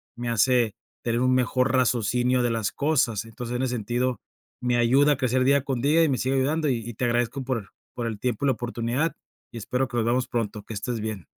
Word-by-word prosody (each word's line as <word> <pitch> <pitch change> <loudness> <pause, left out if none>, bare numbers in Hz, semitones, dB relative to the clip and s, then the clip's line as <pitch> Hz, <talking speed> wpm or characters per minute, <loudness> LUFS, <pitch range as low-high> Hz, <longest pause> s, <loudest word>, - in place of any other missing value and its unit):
me 120 0 -4
hace 115 -1 +3 0.3
tener 120 +1 0
un 130 0 +3
mejor 130 +1 +2
raciocinio 125 0 +2
de 120 - +1
las 115 -3 -1
cosas. 125 -8 +1
Entonces, 120 +2 -6
en 125 - -1
ese 125 -1 -1
sentido, 120 +1 -1 0.4
me 125 -1 +1
ayuda 135 +5 +4
a - - -4
crecer 130 0 +1
día 140 +1 +4
con 135 -3 -2
día 155 +5 +4
y 160 - +3
me 130 - +1
sigue 130 +2 0
ayudando 150 +3 +1
y 125 - +1
y 120 - -8
te 125 - -1
agradezco 120 +2 0
por 120 -6 -3 0.2
por 120 -2 -3
el 110 -3 -4
tiempo 125 +1 -2
y - - +3
la - - +4
oportunidad, 120 +6 -2 0.4
y - - -6
espero 125 +4 -1
que 125 - -8
nos 115 -2 +1
veamos 125 +2 +1
pronto, 105 -3 -3
que 110 - -8
estés 115 +3 -3
bien. 105 -4 -5
125 Hz, 230 wpm, -25 LUFS, 115-130 Hz, 0.4 s, ayuda